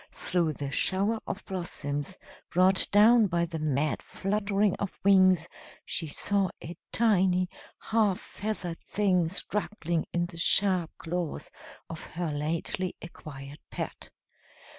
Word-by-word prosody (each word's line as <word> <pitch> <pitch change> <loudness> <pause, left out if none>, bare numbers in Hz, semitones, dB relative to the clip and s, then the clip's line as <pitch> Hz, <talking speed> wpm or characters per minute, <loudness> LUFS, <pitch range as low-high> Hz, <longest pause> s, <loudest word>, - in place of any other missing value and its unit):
Through 170 -3 0
the 140 -1 -5
shower 200 +9 +2
of 200 - -5
blossoms, 160 -3 -3 0.3
brought 185 +2 +4
down 220 +2 +6
by 170 -1 +1
the 165 -1 -5
mad 150 -1 0
fluttering 205 0 0
of 200 - -5
wings, 185 -3 +5 0.4
she 165 - -3
saw 195 +5 0
a 170 - -8 0.2
tiny 185 -5 +3 0.3
half 215 -4 +1
feathered 190 -5 -5
thing 185 -5 +1
struggling 180 -3 -1
in 175 0 0
the 175 -1 -10
sharp 185 -2 +3
claws 170 -1 -4 0.4
of 165 -2 -7
her 170 -1 -4
lately 160 +5 -2
acquired 145 -4 -10
pet. - - -6
180 Hz, 120 wpm, -28 LUFS, 165-200 Hz, 0.4 s, down